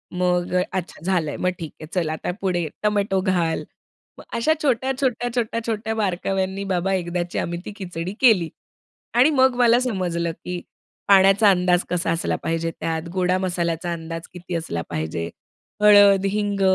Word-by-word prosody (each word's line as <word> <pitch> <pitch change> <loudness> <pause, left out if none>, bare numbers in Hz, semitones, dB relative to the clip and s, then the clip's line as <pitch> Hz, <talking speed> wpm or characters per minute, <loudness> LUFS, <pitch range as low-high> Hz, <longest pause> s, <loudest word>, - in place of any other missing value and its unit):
मग 180 0 0 0.2
अच्छा 180 -4 -4
झालंय, 170 -6 0
मग 180 - +1
ठीक 160 -2 -6
आहे, - - -6
चल 170 -4 0
आता 160 +2 -3
पुढे 175 -4 0 0.2
टोमॅटो 205 -2 +1
घाल. 175 -4 0 0.5
मग - - -11
अशा 310 +7 +3
छोट्या-छोट्या, 260 -2 0
छोट्या-छोट्या 225 -1 -2
बारकाव्यांनी 190 -1 -1
बाबा 185 +1 0
एकदाची, 175 -1 -2
आम्ही 170 0 -3
ती - - -6
खिचडी 180 -2 -5
केली. 205 -11 +5 0.7
आणि 255 +6 +5
मग, 260 -3 +4
मला 240 0 +5
समजलं 180 -8 -1
की 180 -1 -4 0.5
पाण्याचा 195 +1 +6
अंदाज 180 -1 +3
कसा 175 -2 0
असला 165 - -1
पाहिजे 165 0 -1
त्यात, 165 0 -2
गोडा 185 0 +1
मसाल्याचा 175 -2 -2
अंदाज 165 0 -6
किती 180 0 -7
असला 120 - -3
पाहिजे? 80 +2 -3 0.5
हळद, 205 -2 +7
हिंग, 205 -1 -1
185 Hz, 145 wpm, -22 LUFS, 170-210 Hz, 0.7 s, हळद